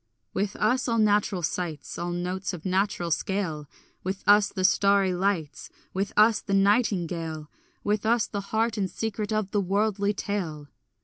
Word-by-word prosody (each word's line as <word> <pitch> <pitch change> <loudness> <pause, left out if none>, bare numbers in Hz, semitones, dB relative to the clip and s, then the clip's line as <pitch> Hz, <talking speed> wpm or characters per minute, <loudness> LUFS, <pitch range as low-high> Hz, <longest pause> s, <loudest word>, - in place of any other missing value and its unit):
With 200 +1 -1
us 250 +5 +1
all 230 -1 +1
natural 205 -4 +2
sights, 160 0 -3
All 175 - -2
notes 180 +2 -3
of 175 0 -8
natural 185 -2 0
scale; 160 -4 -2 0.3
With 190 +1 -4
us 205 0 +6
the 185 - -4
starry 200 0 +4
lights; 180 -5 -2 0.2
With 195 +1 -1
us 215 +1 +5
the 200 - -1
nightingale; 175 -7 +1 0.3
With 210 0 0
us 230 0 +2
the 200 - -4
heart 225 +1 0
and 190 -2 0
secret 215 0 -3
of 215 -2 -1
the 205 - +1
worldly 200 +1 0
tale. 160 -9 -4
195 Hz, 160 wpm, -26 LUFS, 180-210 Hz, 0.3 s, us